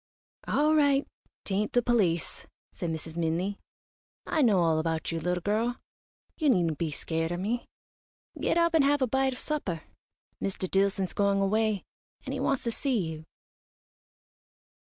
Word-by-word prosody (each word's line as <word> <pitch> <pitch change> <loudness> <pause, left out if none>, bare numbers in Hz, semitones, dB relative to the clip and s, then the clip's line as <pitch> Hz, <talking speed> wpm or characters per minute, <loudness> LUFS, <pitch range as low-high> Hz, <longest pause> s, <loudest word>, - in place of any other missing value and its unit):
"All 305 +2 +3
right 285 -2 +3 0.4
'tain't 205 +2 -1
the 245 - +3
police," 195 -9 +1 0.2
said 175 - -4
Mrs. 160 0 -5
Minley. 170 +4 -1 0.7
"I 315 - +1
know 210 -8 +4
all 165 -2 +3
about 160 0 -1
you, 165 - -2
little 180 +2 -1
girl. 225 +4 0 0.6
You 305 -3 +3
needn't 170 - +2
be 165 - 0
scared 165 +2 -2
o' 175 - -1
me. 220 +7 -2 0.7
Get - - +1
up 335 -1 +3
and 320 -3 +5
have 285 0 +3
a - - +2
bite 265 +2 +1
of - - -8
supper. 200 - -3 0.6
Mr. 190 -1 -2
Dillson's 195 0 +1
going 200 -1 +2
away, 210 0 +1 0.4
and - - -3
he - - -3
wants 275 - 0
to 235 - 0
see 260 +1 0
you." 160 0 -8
200 Hz, 160 wpm, -28 LUFS, 170-250 Hz, 0.7 s, and